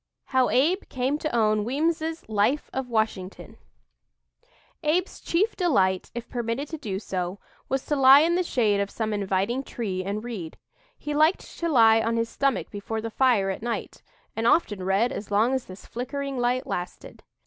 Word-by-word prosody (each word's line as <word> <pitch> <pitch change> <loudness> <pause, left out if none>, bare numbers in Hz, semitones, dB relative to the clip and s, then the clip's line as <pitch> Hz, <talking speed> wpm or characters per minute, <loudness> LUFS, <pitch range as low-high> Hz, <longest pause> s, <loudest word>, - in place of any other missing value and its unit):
HOW 260 -2 +3
ABE 325 +10 +2
CAME 265 +3 -1
TO 310 - -2
OWN 215 -2 +2
WEEMS'S 320 +6 -1
"LIFE 220 +7 0
OF 265 -1 -3
WASHINGTON" 220 -4 -2 1.3
Abe's 340 +5 0
chief 405 +7 0
delight, 190 - +1
if 240 - -5
permitted 240 +4 -3
to 320 - -6
do 205 -9 -3
so, 185 -2 -4 0.3
was 265 0 -1
to 295 - 0
lie 270 +1 +8
in 335 +2 +2
the 360 - +2
shade 220 - +1
of 200 0 -1
some 220 0 -3
inviting 200 +5 0
tree 200 -8 -4
and 200 +3 -3
read. 205 -10 -6 0.4
He 295 - -4
liked 310 +5 +3 0.2
to 335 - -1
lie 225 -5 +6
on 230 +1 0
his 230 0 0
stomach 275 -2 -1
before 210 +2 -4
the 225 +1 -5
fire 220 -7 +2
at 190 - -6
night, 235 0 -4 0.3
and 225 +1 0
often 210 - +2
read 195 +6 +2
as 210 - -6
long 215 +5 +2
as 260 -2 -1
this 185 +1 -12
flickering 275 +3 -4
light 250 +2 0
lasted. 180 -8 -6
240 Hz, 175 wpm, -25 LUFS, 205-280 Hz, 1.3 s, lie